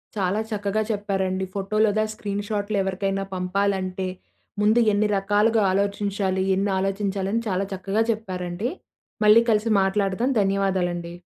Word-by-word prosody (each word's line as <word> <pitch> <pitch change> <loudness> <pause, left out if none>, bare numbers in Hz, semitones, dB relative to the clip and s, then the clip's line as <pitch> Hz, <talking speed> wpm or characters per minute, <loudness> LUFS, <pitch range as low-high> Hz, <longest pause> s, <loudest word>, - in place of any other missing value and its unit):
చాలా 195 0 0
చక్కగా 205 0 -1
చెప్పారండి, 190 -2 -1
ఫోటో 200 +1 -2
లేదా 215 +1 +1
స్క్రీన్ 205 -1 -4
షాట్‌లు 205 0 -1
ఎవరికైనా 195 +1 -1
పంపాలంటే 185 0 -1 0.5
ముందు 215 +3 +4
ఎన్ని 210 +1 +2
రకాలుగా 210 +3 +2
ఆలోచించాలి, 200 -1 0
ఎన్ని 200 +1 0
ఆలోచించాలని 195 +2 -1
చాలా 195 0 0
చక్కగా 195 +4 0
చెప్పారండి. 185 0 -3 0.6
మళ్ళీ 215 +2 +8
కలిసి 215 +1 +1
మాట్లాడదాం. 195 +5 0
ధన్యవాదాలండి. 185 -3 -1
200 Hz, 115 wpm, -24 LUFS, 190-210 Hz, 0.6 s, మళ్ళీ